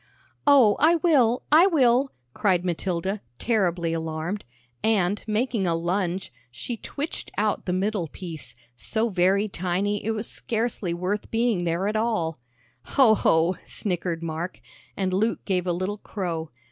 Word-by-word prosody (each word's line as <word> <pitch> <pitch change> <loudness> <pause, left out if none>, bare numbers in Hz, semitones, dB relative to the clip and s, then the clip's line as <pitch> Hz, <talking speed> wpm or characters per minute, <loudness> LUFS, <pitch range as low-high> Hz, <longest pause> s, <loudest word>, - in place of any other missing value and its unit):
"Oh, 260 -8 +6
I 325 +3 +5
will, 275 -8 +3
I 325 +5 +7
will," 265 -6 +3 0.2
cried 185 -4 +1
Matilda, 185 +3 -2 0.2
terribly 180 -7 0
alarmed, 160 +4 -3 0.4
and, 205 -3 +2
making 215 -2 0
a 165 - +2
lunge, 180 0 -2 0.2
she 125 - -5
twitched 290 +7 -5
out 210 0 0
the - - +1
middle 195 -1 0
piece, 160 -6 -8 0.2
so 220 - -1
very 195 +2 +2
tiny 195 +2 -1
it 220 - -2
was 215 +1 -3
scarcely 225 -5 -2
worth 185 +4 -2
being 225 -6 +1
there 170 +3 0
at 210 - -1
all. 215 - 0 0.4
"Hoh, 255 -6 +5
hoh!" 170 -3 +3
snickered 175 -4 -3
Mark. 165 +2 -4 0.4
And 190 -2 0
Luke 220 +5 0
gave 185 -2 0
a - - +2
little 185 +4 -2
crow. 170 -7 -4
195 Hz, 145 wpm, -25 LUFS, 175-225 Hz, 0.4 s, I